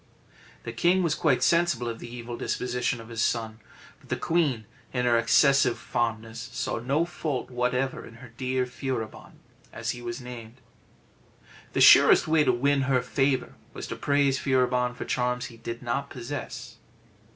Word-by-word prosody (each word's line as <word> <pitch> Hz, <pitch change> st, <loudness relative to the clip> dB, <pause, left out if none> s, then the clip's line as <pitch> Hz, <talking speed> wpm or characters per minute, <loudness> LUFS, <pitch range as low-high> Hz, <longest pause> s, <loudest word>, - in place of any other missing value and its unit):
The 115 Hz, -, -6 dB
king 175 Hz, +9 st, +2 dB
was 165 Hz, -3 st, +1 dB
quite 150 Hz, -5 st, +1 dB
sensible 170 Hz, -8 st, +2 dB
of 115 Hz, -1 st, -4 dB
the 120 Hz, -, -9 dB
evil 120 Hz, 0 st, -6 dB
disposition 125 Hz, 0 st, -2 dB
of 115 Hz, 0 st, -11 dB
his 115 Hz, -1 st, -3 dB
son, 115 Hz, -2 st, -1 dB, 0.4 s
but -, -, -21 dB
the -, -, 0 dB
queen, 145 Hz, -10 st, 0 dB, 0.3 s
in 125 Hz, -1 st, 0 dB
her 120 Hz, -1 st, +4 dB
excessive 120 Hz, +2 st, +4 dB
fondness, 115 Hz, -1 st, -3 dB
saw -, -, -2 dB
no 140 Hz, +8 st, +1 dB
fault 155 Hz, -7 st, -4 dB
whatever 125 Hz, +2 st, -1 dB
in 115 Hz, -, -12 dB
her 120 Hz, 0 st, -13 dB
dear 130 Hz, 0 st, -1 dB
Furibon, 125 Hz, -3 st, -5 dB, 0.4 s
as -, -, -3 dB
he 120 Hz, -, -8 dB
was 120 Hz, +1 st, -5 dB
named. 120 Hz, -2 st, -9 dB, 1.2 s
The -, -, +1 dB
surest -, -, +8 dB
way 155 Hz, -1 st, +4 dB
to 130 Hz, -, +3 dB
win 140 Hz, +3 st, +2 dB
her 130 Hz, -2 st, +2 dB
favour 135 Hz, -1 st, 0 dB, 0.2 s
was -, -, -6 dB
to -, -, -4 dB
praise 140 Hz, -2 st, +1 dB
Furibon 125 Hz, -2 st, +1 dB
for 125 Hz, -, -6 dB
charms 125 Hz, 0 st, -1 dB
he -, -, -14 dB
did 115 Hz, +1 st, -7 dB
not 120 Hz, +3 st, -2 dB
possess. 120 Hz, -2 st, -7 dB
125 Hz, 165 wpm, -27 LUFS, 115-135 Hz, 1.2 s, surest